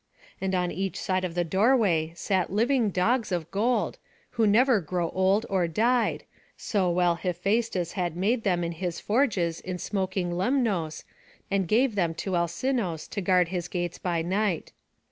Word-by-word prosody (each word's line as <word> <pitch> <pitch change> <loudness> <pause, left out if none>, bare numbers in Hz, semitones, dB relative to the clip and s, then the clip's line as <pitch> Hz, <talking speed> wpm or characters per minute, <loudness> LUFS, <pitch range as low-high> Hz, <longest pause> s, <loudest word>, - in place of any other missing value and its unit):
And 190 0 0
on 180 -1 0
each 190 -2 -3
side 185 0 -1
of 175 -2 -3
the 175 - +1
doorway 190 -4 +2
sat 185 0 -1
living 230 +2 +2
dogs 220 +5 +1
of 170 -2 -2
gold, 230 +5 0 0.3
who 230 -3 +2
never 230 +1 +4
grew 170 +1 -2
old 190 +3 +2
or 185 -3 +1
died, 230 +8 +1 0.3
so 195 -4 0
well 175 0 +3
Hephaistus 185 +1 -1
had 175 -4 -2
made 220 +6 +1
them 180 -4 +1
in 170 - -2
his 170 0 -4
forges 205 - +1
in 185 0 -5
smoking 185 -2 -2
Lemnos, 190 - 0 0.5
and 195 -2 +1
gave 240 +5 +3
them 170 -5 0
to 185 +2 -3
Alcinous 170 - -1
to 200 - -3
guard 180 -2 +3
his 175 -2 -3
gates 175 -1 -3
by 170 -2 -1
night. 190 -1 -1
185 Hz, 165 wpm, -27 LUFS, 175-215 Hz, 0.5 s, never